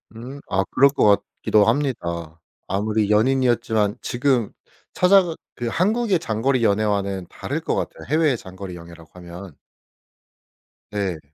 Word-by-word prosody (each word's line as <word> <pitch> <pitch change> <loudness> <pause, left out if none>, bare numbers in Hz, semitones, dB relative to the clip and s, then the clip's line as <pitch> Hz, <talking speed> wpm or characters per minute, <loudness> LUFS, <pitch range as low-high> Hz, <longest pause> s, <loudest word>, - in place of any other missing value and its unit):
음 130 +5 -8
아 95 -1 +1
그럴 140 +1 +5
것 105 -7 +3 0.2
같기도 105 -1 +4
합니다. 85 - -2 0.3
아무리 105 +1 0
연인이었지만 115 -2 +2
지금 125 -3 0 0.4
찾아가 180 -2 +4 0.2
그 120 - -4
한국의 205 - +1
장거리 125 -1 0
연애와는 100 -3 0
다를 - - -4
것 - - -1
같아요 - - -4
해외의 155 -5 +2
장거리 95 -1 -9
연애라고 85 -1 -13
하면. 90 -1 -10 1.3
네. 100 -5 -2
110 Hz, 290 characters per minute, -22 LUFS, 95-135 Hz, 1.3 s, 그럴